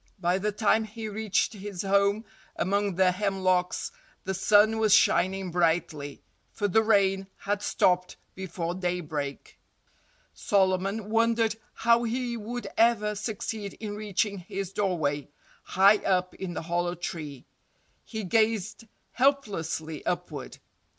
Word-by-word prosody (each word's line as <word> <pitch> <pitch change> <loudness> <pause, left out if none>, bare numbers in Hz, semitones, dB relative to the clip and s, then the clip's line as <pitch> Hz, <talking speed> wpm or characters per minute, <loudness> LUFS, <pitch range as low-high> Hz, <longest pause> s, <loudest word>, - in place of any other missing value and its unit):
By 180 +1 +1
the 210 +2 0
time 215 +1 +2
he 220 +1 -7
reached 215 +1 0
his 200 -3 -6
home 200 +2 +2 0.3
among 200 0 0
the 185 0 +4
hemlocks 185 -2 0 0.3
the 190 - -2
sun 210 +3 +4
was 215 -3 +5
shining 185 +1 +2
brightly—for 165 +3 -2
the 215 +3 +4
rain 195 -3 +2
had 205 0 -2
stopped 180 -2 +1 0.2
before 175 -2 -4
daybreak. 165 -6 -4 0.7
Solomon 195 +2 0
wondered 230 -1 +2 0.2
how 235 +1 +3
he 240 +1 -2
would 235 +2 -5
ever 225 -2 +3
succeed 210 -1 -4
in 210 -2 -5
reaching 205 -1 -1
his 195 +2 -5
doorway, 155 -9 -1 0.3
high 200 +3 +5
up 185 -2 0
in 180 -3 -6
the - - -4
hollow 175 +1 -1
tree. 155 -6 -6 0.6
He 220 -1 -6
gazed 220 +2 0 0.2
helplessly 195 - 0
upward. - - -4
195 Hz, 120 wpm, -27 LUFS, 180-215 Hz, 0.7 s, was